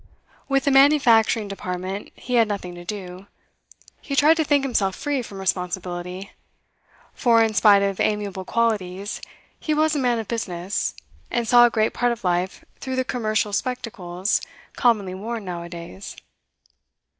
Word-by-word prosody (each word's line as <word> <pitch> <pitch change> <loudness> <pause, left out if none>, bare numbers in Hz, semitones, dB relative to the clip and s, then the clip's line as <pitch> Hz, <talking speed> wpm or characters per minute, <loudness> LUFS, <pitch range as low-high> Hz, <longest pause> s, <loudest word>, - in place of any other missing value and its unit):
With 275 0 +1
the 280 - +3
manufacturing 245 -6 +5
department 190 0 -5
he 250 - -7
had 230 -2 +5
nothing 200 -4 -4
to 175 0 -10
do; 185 0 -7 0.7
he 280 - -4
tried 300 +3 +6
to 320 - +2
think 285 -2 +2
himself 205 -8 0
free 290 -3 -2
from 205 -4 -9
responsibility; 180 0 -3 0.8
for, 230 -3 +4
in 220 -1 0
spite 205 -2 +5
of 195 -1 -1
amiable 205 -3 -1
qualities, 205 -3 -1 0.4
he 310 - -1
was 310 +1 +2
a - - +1
man 245 -3 +1
of 225 -2 -4
business, 190 -4 -3 0.3
and 235 -1 -1
saw 240 +1 +7
a - - 0
great 220 -1 +1
part 245 0 +1
of 235 - -5
life 180 +1 -1
through 260 -1 -4
the 260 0 0
commercial 215 -4 -1
spectacles 200 -6 -2 0.3
commonly 215 -7 +2
worn 220 +3 -5
now 175 -2 -5
a 170 - -8
days. 170 +3 -9
210 Hz, 155 wpm, -23 LUFS, 185-245 Hz, 0.8 s, saw